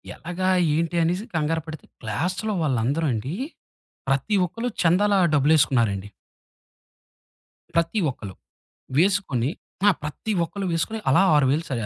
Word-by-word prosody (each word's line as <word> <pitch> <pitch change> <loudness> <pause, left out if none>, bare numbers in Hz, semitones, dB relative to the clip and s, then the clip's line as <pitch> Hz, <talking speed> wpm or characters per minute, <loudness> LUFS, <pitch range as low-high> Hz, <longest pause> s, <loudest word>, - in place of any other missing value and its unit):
ఎలాగా 180 +2 -3 0.3
ఏంటి 170 +2 -1
అనేసి 180 +6 -1
కంగారు 160 +1 0
పడితే, 155 -1 -8 0.2
క్లాస్‌లో 180 - -2
వాళ్ళందరు 140 +2 0
అండి, 115 +7 -3 0.7
ప్రతి 135 - +1
ఒక్కళ్ళు 230 +8 -4
చందాల 190 +5 +3 0.2
డబ్బులేసుకున్నారండి. 130 -9 +2 1.7
ప్రతి 170 +6 +1
ఒక్కళ్ళు. 100 -7 -9 0.6
వేసుకొని 170 - +2 0.4
ఆ! - - +9
ప్రతి 150 +8 -4
ఒక్కళ్ళు 195 +3 -4
వేసుకొని. 165 +7 -1
అలా 140 +8 +5
6000 145 +2 +3
స - - -8
160 Hz, 110 wpm, -24 LUFS, 135-185 Hz, 1.7 s, ఆ